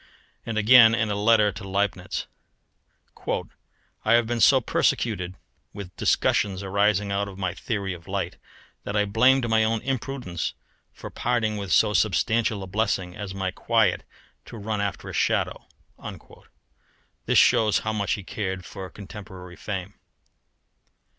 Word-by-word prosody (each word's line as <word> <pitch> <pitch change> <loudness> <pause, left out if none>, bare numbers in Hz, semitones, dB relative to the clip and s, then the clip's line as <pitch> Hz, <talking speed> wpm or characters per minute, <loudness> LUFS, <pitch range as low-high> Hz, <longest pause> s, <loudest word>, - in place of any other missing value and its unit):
And 115 -1 -3
again 115 +1 +7
in 110 -3 0
a - - -1
letter 105 0 +4
to 95 +2 -9
Leibnitz: 95 -1 -2 1.8
"I - - +3
have 120 0 +4
been 120 +1 -2
so 135 - +6
persecuted 95 -6 0 0.4
with 95 -3 -9
discussions 100 -2 +1
arising 100 +1 +1
out 100 +1 -1
of 95 -1 -10
my 95 -2 -2
theory 100 -4 -3
of 85 -1 -12
light - - -3 0.5
that 100 - -4
I 105 0 +3
blamed 125 +5 +3
my 110 -1 +3
own 110 +1 +1
imprudence 130 -9 -3 0.4
for - - -10
parting 115 -3 0
with 100 -3 -5
so 105 -1 +4
substantial 110 0 +1
a - - -5
blessing 95 -2 -1
as 100 -2 -6
my 95 -1 -2
quiet 115 +2 +1 0.4
to 115 - -10
run 105 0 -3
after 100 -2 -3
a - - -7
shadow." - - 0 1.6
This - - +3
shows 110 -2 +5
how 110 - 0
much 100 -2 0
he 100 - -4
cared 95 -2 -4
for 95 -2 -8
contemporary 95 -3 -10
fame. 95 0 -5
105 Hz, 145 wpm, -25 LUFS, 95-110 Hz, 1.8 s, again